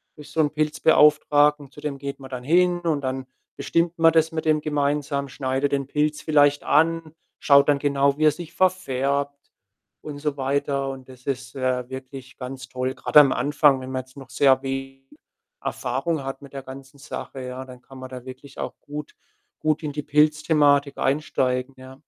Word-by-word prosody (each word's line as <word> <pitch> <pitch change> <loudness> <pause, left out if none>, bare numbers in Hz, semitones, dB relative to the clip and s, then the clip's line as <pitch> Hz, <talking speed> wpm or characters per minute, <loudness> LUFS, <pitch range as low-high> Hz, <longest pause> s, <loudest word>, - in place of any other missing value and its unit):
durch 150 -2 -13
so 160 - -4
'n 150 -2 +1
Pilzbeauftragten. 150 -1 +3
Zu 150 - -13
dem 145 -2 -4
geht 140 +1 -6
man 135 -1 -11
dann 125 -1 -6
hin 175 +4 +3
und 155 -4 0
dann 130 0 -3 0.3
bestimmt 170 +1 0
man 165 0 +5
das 160 0 +3
mit 160 0 -4
dem 155 -1 +2
gemeinsam, 145 -1 -1
schneidet 135 +1 -1
den 140 -1 -1
Pilz 150 +1 -1
vielleicht 145 -2 +3
an, 160 +1 +2 0.3
schaut 140 0 +5
dann 145 -1 +3
genau, 140 0 +1
wie 155 - +2
er 155 - +6
sich 170 +2 -9
verfärbt 140 -6 -1 0.5
und 145 -2 -8
so 145 -1 -2
weiter 140 0 -1
und 130 -1 -11
das 125 -1 -15
ist, 130 -1 -4
äh, 130 -1 -1
wirklich 130 0 -9
ganz 130 0 -8
toll. 130 +1 -2
Grade - - +5
am 135 -2 +3
Anfang, 140 0 +3
wenn 130 - -7
man 130 0 -3
jetzt 130 +1 -23
noch 135 -2 -11
sehr 135 -2 +4
we 135 0 -5 0.6
Erfahrung 135 +4 -2
hat 135 0 -6
mit 140 -1 -13
der 135 - -5
ganzen 135 +1 -12
Sache, 135 -2 -7
ja, 130 +1 -6
dann 125 -1 -13
kann 135 - -14
man 130 - -7
da 125 -1 -8
wirklich 130 +1 -11
auch - - -4
gut 150 0 -8 0.5
gut 155 +1 0
in 150 - -3
die 150 - -4
Pilzthematik 150 -1 +3
einsteigen, 130 -2 -1
ja. 130 0 -12
140 Hz, 190 wpm, -23 LUFS, 130-150 Hz, 0.6 s, er